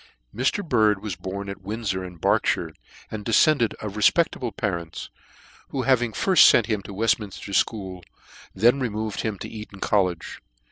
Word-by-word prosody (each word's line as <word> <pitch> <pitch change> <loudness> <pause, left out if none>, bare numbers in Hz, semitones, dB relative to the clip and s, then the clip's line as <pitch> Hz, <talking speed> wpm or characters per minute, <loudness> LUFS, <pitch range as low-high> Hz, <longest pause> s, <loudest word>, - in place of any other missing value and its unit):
A/TR. 130 - 0
BIRD 105 -6 +2
was 105 -5 -4
born 95 +3 -6
at 100 0 -7
Windfor, 100 -1 -3
in 90 -1 -8
Berkshire, - - +1 0.2
* - - -22
and 110 -1 -5
defcendcd 120 +2 +3
of 105 -2 -7
refpectable 125 +3 +2
parents, 85 -5 -4 0.6
who 130 - -2
having 120 -2 +2
firft 185 - +6
fent 115 - +3
him 105 -3 -1
to 95 - -10
Weftminfter 105 -1 -1
School, 95 -2 -1 0.5
then 120 +7 +4
removed 110 -4 -3
him 110 -3 -3
to - - -7
Eton 105 -3 -10
College. 90 -6 -1
105 Hz, 155 wpm, -24 LUFS, 95-115 Hz, 0.6 s, firft